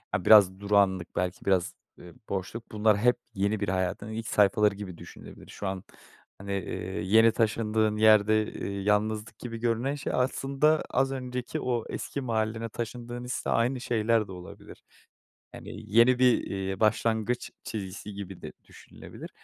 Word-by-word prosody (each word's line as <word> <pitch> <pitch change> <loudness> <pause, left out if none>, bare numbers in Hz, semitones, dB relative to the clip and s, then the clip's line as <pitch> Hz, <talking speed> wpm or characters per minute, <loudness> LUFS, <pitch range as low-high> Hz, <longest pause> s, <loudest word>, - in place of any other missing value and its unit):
Ya, 90 - -3
biraz 95 -3 +7
durağanlık, 100 -3 +1
belki 90 0 -2
biraz, 95 -3 +1 0.2
eee, 90 -1 -13 0.2
boşluk 100 +4 -5
bunlar 105 -1 +3
hep 125 +4 +3 0.2
yeni 100 +2 0
bir 100 - -2
hayatın 95 +3 -2
ilk 110 0 -5
sayfaları 105 0 +3
gibi 95 -4 -8
düşünülebilir. - - -12
Şu 100 - -6
an 95 -1 -4 0.6
hani, 100 0 -5
eee, 100 -2 -4
yeni 110 +4 +5
taşındığın 110 -1 +1
yerde, 110 0 +5
eee, 100 0 -4
yalnızlık 105 +2 0
gibi 115 -2 -6
görünen 120 +4 0
şey 140 - -4
aslında 135 +4 +1
az 135 +1 +1
önceki 125 -2 -4
o 120 -3 -1
eski 140 - -4
mahallene 110 -2 -2
taşındığın 120 +2 -6
hisle 125 - -3
aynı 125 +2 +1
şeyler 115 -2 +1
de - - -10
olabilir. 90 -1 -11 0.7
Hani - - -10 0.3
yeni 125 +2 +6
bir, 125 -2 +5
eee, 95 -1 -4
başlangıç 110 +2 0
çizgisi 100 -1 -6
gibi 100 -2 -8
de - - -8
düşünülebilir - - -12
110 Hz, 150 wpm, -28 LUFS, 100-120 Hz, 0.7 s, biraz